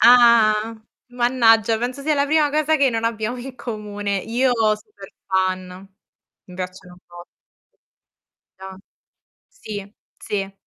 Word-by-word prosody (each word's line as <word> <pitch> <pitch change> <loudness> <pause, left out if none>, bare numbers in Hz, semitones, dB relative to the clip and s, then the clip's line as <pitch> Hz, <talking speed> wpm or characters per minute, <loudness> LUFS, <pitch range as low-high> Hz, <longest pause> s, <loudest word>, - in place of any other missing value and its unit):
Ah! 230 -2 +5 0.3
Mannaggia, 235 -3 +3
penso 250 +4 -4
sia 305 +1 +1
la 280 0 +1
prima 305 -1 +2
cosa 310 +1 +2
che 275 -3 +3
non 225 0 -2
abbiamo 230 +1 -2
in 260 +1 -8
comune. 205 -4 -4
Io, 240 +6 0 0.3
super 200 -2 -15 0.2
fan. 185 0 -2 0.6
Mi 180 - -14
piacciono 180 -1 -8
un - - -20
bo 175 0 -12 1.4
Ah. 190 0 -9 0.7
Sì, 205 - -8 0.3
sì. 195 -1 -4
225 Hz, 125 wpm, -21 LUFS, 195-250 Hz, 1.4 s, Ah